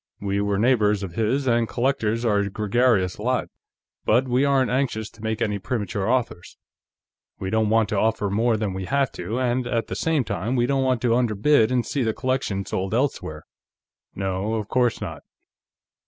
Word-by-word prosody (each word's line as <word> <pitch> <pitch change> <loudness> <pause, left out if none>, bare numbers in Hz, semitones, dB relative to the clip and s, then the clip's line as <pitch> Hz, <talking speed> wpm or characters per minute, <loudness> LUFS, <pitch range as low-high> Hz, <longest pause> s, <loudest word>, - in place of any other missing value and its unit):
"We 100 0 -1
were 100 -1 0
neighbors 105 -3 +2
of 90 -3 -6
his, 115 +7 0
and 120 -2 +2
collectors 120 -3 0
are 105 -3 +3
a 100 0 -1
gregarious 105 -2 +1
lot. 125 +4 -1 0.5
But 125 +4 +3
we 125 +2 +2
aren't 135 -3 +2
anxious 125 -5 -1
to 110 - -17
make 110 -1 -1
any 105 -2 -1
premature 105 -2 -2
offers. 120 -8 -2 0.8
We 95 0 -4
don't 110 -1 +2
want 110 -1 +3
to - - 0
offer 110 -2 0
more 115 +2 +2
than 105 -3 -2
we 95 0 -4
have 140 +2 +1
to, 115 +4 -4
and 125 0 0
at 115 -1 -1
the - - -3
same 160 -4 +1
time, 110 +3 -2
we 120 -1 +2
don't 135 +1 +1
want 130 -2 0
to 120 -1 +3
underbid 120 +1 +3
and 125 -2 +1
see 140 - -2
the 110 -3 0
collection 130 -7 -1
sold 95 +3 -2
elsewhere." 115 - -2 0.7
"No, 95 +3 -2
of 105 -2 -3
course 125 -1 +1
not." - - -6
115 Hz, 185 wpm, -24 LUFS, 105-125 Hz, 0.8 s, are